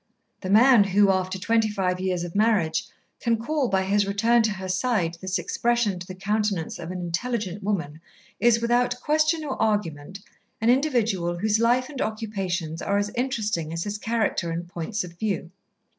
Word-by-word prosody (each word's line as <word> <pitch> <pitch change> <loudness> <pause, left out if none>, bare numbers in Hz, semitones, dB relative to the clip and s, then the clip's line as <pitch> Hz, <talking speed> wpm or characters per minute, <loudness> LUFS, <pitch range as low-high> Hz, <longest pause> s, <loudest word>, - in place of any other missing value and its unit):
The 185 - -6
man 230 +2 +7
who, 195 +1 +4
after 185 0 -1
twenty 225 +3 +1
five 185 -3 -1
years 185 -2 -1
of 175 -1 -6
marriage, 205 -7 +2 0.3
can 235 -1 +1
call, 270 +4 -1
by 190 -3 +1
his 200 +1 +1
return 225 +4 +3
to 220 -1 +1
her 190 -1 -6
side, 185 -4 0
this 190 0 -1
expression 235 -6 0
to 180 - -9
the 185 - -7
countenance 200 -3 -1
of 165 - -6
an 185 0 -4
intelligent 200 +2 -3
woman 170 -7 -3 0.4
is, 230 -1 +4
without 245 +1 +1
question 310 +2 +1
or 275 - -4
argument, 190 -5 -1 0.4
an 225 +2 +4
individual 225 - +1
whose 215 +3 +1
life 245 +2 +2
and 280 -3 -6
occupations 190 -7 -3
are 200 - 0
as 205 0 -1
interesting 215 - -2
as 165 0 -3
his 205 0 -4
character 220 -6 -1
and 170 +1 -4
points 180 +5 -3
of 175 -1 -11
view. 195 -6 -2
205 Hz, 175 wpm, -25 LUFS, 180-230 Hz, 0.4 s, man